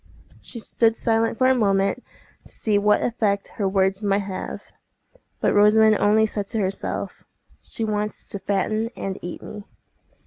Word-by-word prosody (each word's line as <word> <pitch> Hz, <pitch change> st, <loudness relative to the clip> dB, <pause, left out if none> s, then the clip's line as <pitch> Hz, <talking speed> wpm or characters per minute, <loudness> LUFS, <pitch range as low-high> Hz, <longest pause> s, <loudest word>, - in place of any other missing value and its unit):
She -, -, -9 dB
stood 225 Hz, 0 st, +1 dB
silent 225 Hz, 0 st, 0 dB
for 255 Hz, -, +2 dB
a 260 Hz, -, +5 dB
moment, 200 Hz, 0 st, +1 dB, 0.4 s
to -, -, -9 dB
see 210 Hz, -2 st, 0 dB
what 210 Hz, +1 st, +3 dB
effect 210 Hz, -4 st, 0 dB
her 195 Hz, -2 st, +1 dB
words 190 Hz, +1 st, +1 dB
might 200 Hz, -1 st, +1 dB
have. 190 Hz, -1 st, -6 dB, 0.8 s
But -, -, +2 dB
Rosamond 215 Hz, +1 st, +5 dB
only 215 Hz, +1 st, +4 dB
said 205 Hz, -2 st, -4 dB
to 225 Hz, -, -3 dB
herself,— 195 Hz, -1 st, -3 dB, 0.4 s
"She 225 Hz, -, -5 dB
wants 210 Hz, -1 st, -3 dB
to 200 Hz, -, -5 dB
fatten 215 Hz, +3 st, -1 dB
and 195 Hz, -1 st, -5 dB
eat 175 Hz, -, -7 dB
me." 210 Hz, -, -8 dB
210 Hz, 160 wpm, -23 LUFS, 195-220 Hz, 0.8 s, a